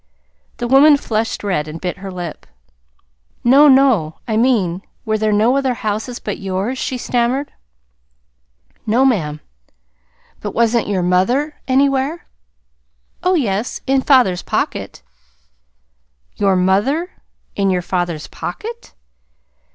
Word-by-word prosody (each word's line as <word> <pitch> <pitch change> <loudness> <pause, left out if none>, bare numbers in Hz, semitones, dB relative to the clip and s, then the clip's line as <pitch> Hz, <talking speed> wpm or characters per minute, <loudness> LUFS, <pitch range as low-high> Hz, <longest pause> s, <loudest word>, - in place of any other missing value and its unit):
The 240 - -3
woman 285 +4 +6
flushed 225 -5 -2
red 180 -7 -1
and 155 +2 -7
bit 180 +2 -4
her 195 +1 -8
lip. 175 -3 -7 1.0
"No, 275 +5 +6
no, 260 - +4
I 220 - -1
mean 215 -7 +1 0.2
were 215 -1 0
there 215 0 +1
no 220 +5 +3
other 265 -3 0
houses 220 +3 -3
but 210 - -5
yours?" 195 +6 -3
she 255 - -2
stammered. 245 +3 -1 1.4
"No, 240 +5 +3
ma'am." 155 - 0 1.0
"But, - - -6
wasn't 235 0 +2
your 195 -3 0
mother 240 - +1
anywhere?" 275 +4 +1 1.0
"Oh, 365 +1 +2
yes, 225 - -1
in 270 0 +2
father's 250 -11 +3
pocket." - - -3 1.3
"Your 195 -2 +2
MOTHER 205 - +1 0.4
in 200 -1 +1
your 180 -1 0
father's 175 -4 -2
POCKET!" 465 +2 -7
225 Hz, 120 wpm, -18 LUFS, 190-265 Hz, 1.4 s, woman